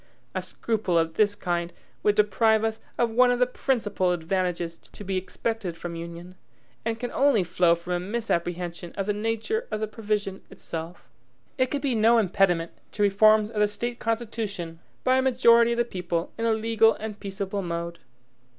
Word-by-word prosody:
A - - -1
scruple 215 -6 -1
of 165 0 +1
this 205 +1 +2
kind 175 -3 -2 0.3
would 210 -1 +3
deprive 215 +1 +3
us 220 0 -1 0.2
of 235 -1 +2
one 250 +2 +5
of 245 - +2
the 250 - +4
principal 225 -7 0
advantages 175 -1 -2
to - - -12
be 195 -1 -2
expected 190 -1 -3
from 170 0 -6
union, 170 +2 -8 0.5
and 225 0 -2
can 245 0 -4
only 270 -8 +3
flow 175 -1 +3
from 170 +1 -5
a 175 - 0
misapprehension 175 -4 -3
of 195 - -1
the 210 - 0
nature 225 - -2
of 215 - -2
the 215 - 0
provision 210 -2 -3
itself. 165 +1 -7 0.5
It 255 0 +3
could 285 0 -3
be 270 -3 +1
no 225 +1 +5
impediment 180 -5 +2 0.2
to 205 - 0
reforms 215 +2 +5
of 215 - -3
the 210 - +5
State 235 +4 -4
constitution 215 -7 -3 0.2
by 255 +1 +4
a - - +3
majority 235 -2 +5
of - - -3
the 240 - +2
people 180 -5 -3
in 230 - -2
a 225 - +3
legal 225 0 +3
and 215 -1 -6
peaceable 200 0 -4
mode. 170 -1 -4
210 Hz, 180 wpm, -26 LUFS, 175-230 Hz, 0.5 s, one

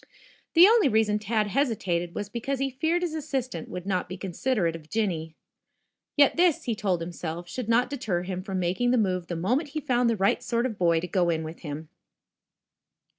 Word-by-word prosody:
The 340 +2 +10
only 440 -2 +5
reason 215 -2 +2
Tad 215 +1 0
hesitated 195 -8 -1
was 205 - -3
because 240 +6 -3
he 270 +1 -1
feared 320 +7 0
his 340 -3 -2
assistant 260 - -3
would 180 0 -6
not 185 -3 -1
be 185 - -6
considerate 185 -1 -1
of 155 -2 -11
Jinny. 170 -8 -2 0.8
Yet 285 +1 +5
this, 345 -3 +3
he 235 - -1
told 190 -5 -1
himself, 170 0 -5
should 230 +5 -5
not 240 +2 +4
deter 220 -11 -2
him 185 0 -4
from 190 0 -4
making 185 +7 0
the 250 - +3
move 185 -5 0
the 175 - -3
moment 250 - 0
he 310 +2 -3
found 245 -4 +1
the 230 - +1
right 195 +1 +2
sort 235 0 0
of 260 - 0
a - - -9
boy 170 -3 +2
to 180 - -4
go 180 -2 +1
in 160 -1 0
with 160 +1 -8
him. 150 0 -7
210 Hz, 205 wpm, -27 LUFS, 175-255 Hz, 0.8 s, The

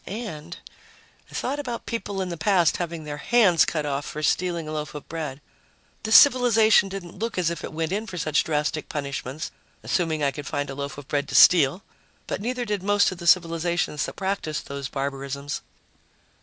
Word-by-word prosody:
And... 175 -6 -6 0.7
I - - -11
thought 280 +3 -2
about 245 -5 -5
people 205 -4 -3
in 185 - -5
the 170 - -4
past 175 -1 +2
having 170 -2 -4
their 150 -1 -6
hands 180 0 +4
cut 155 -2 -2
off 140 0 -2
for 155 +2 -6
stealing 170 -1 0
a - - -5
loaf 150 -1 -4
of 150 - -8
bread. 150 -4 -5 0.6
This 220 0 +2
civilization 225 -7 +6
didn't 190 -2 -8
look 230 -1 -3
as 175 -2 +1
if 170 - -6
it - - -5
went 160 +1 -2
in 210 +3 -2
for 180 - -7
such 155 -2 +1
drastic 150 0 -2
punishments, 140 0 -4 0.3
assuming 160 -4 0
I 140 - +2
could 145 0 -8
find 145 -1 -2
a - - -5
loaf 140 +1 -5
of 145 -2 -10
bread 145 -1 -1
to - - -5
steal. 170 +1 +6 0.4
But - - -4
neither 245 +2 -2
did 210 -3 -2
most 205 +1 +3
of 185 - -8
the 170 - -5
civilizations 170 -2 +2
that - - -8
practiced 190 -6 -3
those 140 -1 -5
barbarisms. 140 0 -4
165 Hz, 195 wpm, -25 LUFS, 150-195 Hz, 0.7 s, civilization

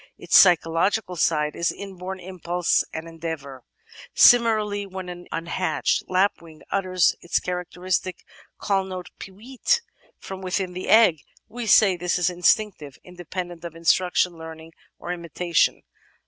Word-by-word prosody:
Its - - -1
psychological 180 +3 +4
side 150 -2 0
is 170 - 0
inborn 190 -1 -8
impulse 180 -1 -1
and 160 +1 -6
endeavour. 160 -5 -7 0.5
Similarly, 215 -4 +4
when 190 -1 -7
an 175 0 -9
imhatched 170 +2 -1
lapwing 180 -4 -1
utters 185 -3 +2
its 175 - 0
characteristic 180 +1 -3 0.3
call 195 -1 0
note 185 -1 -8
"peewit" 245 - -2 0.4
from 190 0 -9
within 185 0 -2
the 185 +1 -6
egg, 220 -8 +5 0.3
we 240 0 -7
say 200 -2 +5
this 175 0 -1
is 180 0 +1
instinctive 175 -4 0
— - - -33
^independent 175 -1 -7
of 170 -1 -8
instruction, 175 +1 +1
learning, 160 0 -10 0.2
or 175 - -5
imitation. 170 -1 0
180 Hz, 130 wpm, -23 LUFS, 170-190 Hz, 0.5 s, egg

